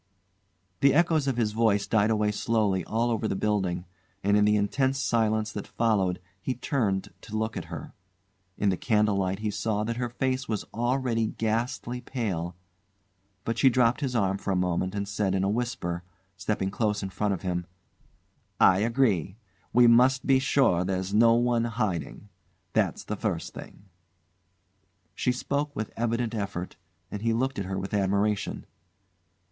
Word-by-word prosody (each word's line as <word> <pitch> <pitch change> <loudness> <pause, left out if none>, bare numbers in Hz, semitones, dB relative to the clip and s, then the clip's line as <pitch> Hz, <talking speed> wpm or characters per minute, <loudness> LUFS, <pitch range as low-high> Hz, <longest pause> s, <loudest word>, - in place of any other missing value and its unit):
The 140 0 +4
echoes 160 -3 +3
of 130 -3 0
his 110 -3 +1
voice 105 -2 +2
died 110 -1 +2
away 105 -1 +2
slowly 105 -4 +1
all 115 +2 0
over 110 -1 0
the - - -1
building, 95 -4 -1 0.4
and 100 +1 +3
in 105 0 +4
the 105 0 +4
intense 130 +6 +1
silence 110 -4 +1
that 105 - -6
followed 100 -6 +1 0.2
he 130 - -2
turned 100 -8 -1
to 110 - -5
look 110 0 -2
at - - -4
her. - - -8 0.6
In 100 - +2
the 95 - 0
candle 105 -4 +2
light 95 0 0
he 105 -1 -1
saw 105 +1 -1
that 115 +2 -3
her 120 -1 -2
face 130 +2 -2
was 110 -2 -1
already 120 -1 0
ghastly 120 +3 -2
pale; 95 -10 -3 0.9
but 115 0 -2
she 135 - +6
dropped 125 +1 +2
his 130 -3 -2
arm 100 -3 +1
for - - -5
a 95 - +2
moment 90 +1 0
and 100 0 -2
said 100 -1 0
in 95 - +1
a 95 - +1
whisper, 105 -7 -2 0.3
stepping 95 +1 -2
close 105 -1 0
in 95 - -4
front 105 0 0
of - - -10
him 90 -1 -2 0.9
"I 95 0 +6
agree. 110 - +1 0.3
We 125 0 +6
must 125 +3 +5
be 135 -1 +4
sure 130 -10 +3
there's 95 +1 -2
no 115 +2 +6
one 120 -1 +2
hiding. 105 - -3 0.4
That's - - +1
the 105 - -4
first 100 -5 -3
thing." 100 - -11 1.3
She 125 - 0
spoke 140 +3 -2
with 110 0 -4
evident 115 0 -1
effort, 100 -4 -4 0.4
and 105 - -5
he 115 0 +1
looked 130 +1 -1
at 100 - -3
her 95 0 -3
with 95 +2 -5
admiration. 100 +1 0
110 Hz, 170 wpm, -27 LUFS, 100-120 Hz, 1.3 s, she